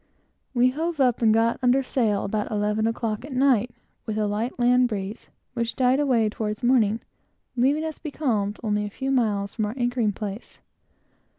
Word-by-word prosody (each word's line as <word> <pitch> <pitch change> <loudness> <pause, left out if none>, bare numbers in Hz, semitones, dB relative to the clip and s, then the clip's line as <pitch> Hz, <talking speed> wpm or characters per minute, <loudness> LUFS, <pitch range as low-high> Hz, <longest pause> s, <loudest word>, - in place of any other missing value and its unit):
We 250 +1 +4
hove 320 +3 -3
up 250 -3 +2
and 225 -2 +5
got 225 +1 +2
under 255 +2 +3
sail 225 -6 0
about 210 +1 -2
eleven 210 +1 0
o'clock 225 -1 -2
at 280 0 -8
night, 255 -3 +3 0.4
with 215 -1 -2
a 215 - +1
light 210 +4 -2
land 250 0 +4
breeze, 205 -1 -5 0.2
which 235 -1 -2
died 260 +1 +3
away 250 -6 +2
toward 210 +1 -4
morning, 230 -3 +3 0.5
leaving 275 +5 +2
us 315 -1 -5
becalmed 235 -10 -2
only 210 -1 0
a 205 - -4
few 265 +6 -3
miles 210 -6 0
from 215 - -1
our 215 - -5
anchoring 240 -3 +1
place. 205 +2 -7
230 Hz, 175 wpm, -24 LUFS, 210-255 Hz, 0.5 s, and